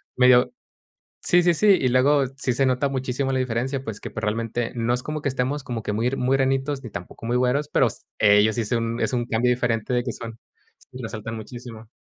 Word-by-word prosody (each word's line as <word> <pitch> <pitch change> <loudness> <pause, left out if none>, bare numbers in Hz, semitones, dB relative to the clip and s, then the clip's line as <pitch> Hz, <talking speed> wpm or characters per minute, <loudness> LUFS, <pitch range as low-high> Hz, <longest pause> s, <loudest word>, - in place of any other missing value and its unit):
medio 125 -1 +5 0.7
Sí, 175 0 +4
sí, 175 -1 +3
sí. 210 +4 +3
Y 130 - +2
luego, 135 +2 +3
sí 130 -3 0
se 135 +1 +2
nota 130 +2 +1
muchísimo 135 0 -2
la 130 - 0
diferencia, 130 +2 -2
pues, 110 -5 -6
que - - -7
probablemente 115 +3 -2
no 120 0 0
es 125 - -1
como 150 +2 -5
que - - +1
estemos 135 +2 -2
como 120 -3 -4
que 105 - -3
muy, 115 +4 0
muy 135 +1 +1
granitos, 135 +1 0
ni 120 - -8
tampoco 90 +5 -8
muy 120 +2 0
güeros, 125 +4 +1
pero 135 -3 +3
s 115 - -7 0.2
ellos 105 +1 +5
sí 120 - 0
es 105 - -5
un 115 0 -1
es - - 0
un 120 -1 0
cambio 120 +1 +1
diferente 115 -2 0
de 120 -1 +1
que 120 - -3
son 115 -1 -8 0.5
Sí, 125 - -9
resaltan 110 0 -5
muchísimo. 115 0 -9
125 Hz, 225 wpm, -24 LUFS, 115-135 Hz, 0.7 s, medio